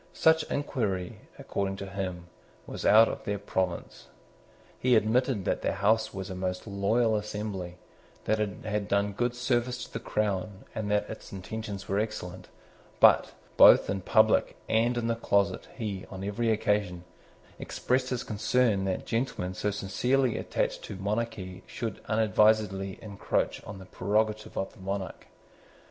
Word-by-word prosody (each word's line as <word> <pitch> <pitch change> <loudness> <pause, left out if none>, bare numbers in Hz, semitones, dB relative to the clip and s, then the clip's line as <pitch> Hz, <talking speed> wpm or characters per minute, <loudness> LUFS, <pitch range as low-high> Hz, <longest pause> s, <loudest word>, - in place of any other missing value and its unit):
Such 160 0 +4
inquiry, 105 -11 -2 0.2
according 95 -1 -2
to 100 - -6
him, 95 -3 -4 0.4
was - - -3
out 110 +2 +8
of - - -5
their 100 0 -2
province. 95 -3 -3 0.7
He 125 -1 +4
admitted 110 -1 +2
that - - 0
the - - 0
House 110 +2 +2
was 95 0 -6
a - - -4
most 90 0 -3
loyal 110 +3 +1
assembly, 105 -4 -4 0.5
that 110 0 +1
it 105 -2 -3
had 105 -1 -1
done 100 0 +1
good 120 +3 -1
service 125 0 0
to - - -17
the 115 - -3
crown, 105 -2 -2
and 105 -1 -3
that 105 0 +1
its 110 - -9
intentions 100 0 -6
were 100 +1 +1
excellent. 90 -4 -4 0.5
But, - - +6 0.2
both - - +8
in 95 -1 -2
public - - +3
and 120 +2 +2
in 120 - -1
the 115 - +2
closet, 100 -3 +1
he, 105 -6 -4
on 95 -1 -7
every 105 +4 -1
occasion, 105 -5 0 0.6
expressed 130 0 -1
his 125 -2 -2
concern 110 -1 +1
that 95 -1 -2
gentlemen 115 -6 -2
so 95 +3 -1
sincerely 115 +5 +1
attached - - -2
to - - -7
monarchy 100 -2 -3
should 115 -2 -5
unadvisedly 105 -3 +2
encroach 100 -2 -2
on 100 - -7
the 95 - -11
prerogative 105 +4 -1
of 95 - -2
the - - -18
monarch. 95 -1 -5
105 Hz, 155 wpm, -29 LUFS, 95-115 Hz, 0.7 s, out